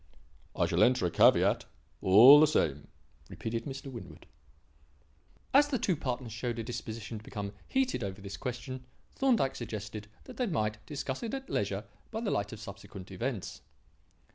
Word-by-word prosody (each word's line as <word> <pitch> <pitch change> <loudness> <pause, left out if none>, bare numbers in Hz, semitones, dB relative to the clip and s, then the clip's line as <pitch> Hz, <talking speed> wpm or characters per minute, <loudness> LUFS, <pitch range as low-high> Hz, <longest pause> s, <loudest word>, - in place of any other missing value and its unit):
"I - - +2
shall - - +1
enter 125 -6 +4
a 85 - 0
caveat, - - +4 0.4
all 120 +10 +9
the 155 - +7
same," 75 - 0 0.4
repeated 115 0 -4
Mr. 135 0 -6
Winwood. 95 -11 -10 1.3
As 285 +2 +7
the 280 -3 0
two 190 -5 +1
partners 125 -5 -4
showed 120 +1 -3
a 115 - -3
disposition 110 -1 -6
to - - -16
become 100 -1 -5
heated 260 - 0
over 100 0 -5
this 100 0 -7
question, 125 +3 -5 0.3
Thorndyke 240 - +2
suggested 105 -2 -6 0.2
that - - -12
they 250 - 0
might 105 - -1
discuss 135 -2 -4
it 235 +3 -3
at 270 0 -7
leisure 100 0 -1 0.3
by 220 - -4
the 225 - -1
light 100 +1 -1
of 110 - -8
subsequent 100 -2 -10
events. 110 +2 -4
115 Hz, 165 wpm, -31 LUFS, 105-140 Hz, 1.3 s, all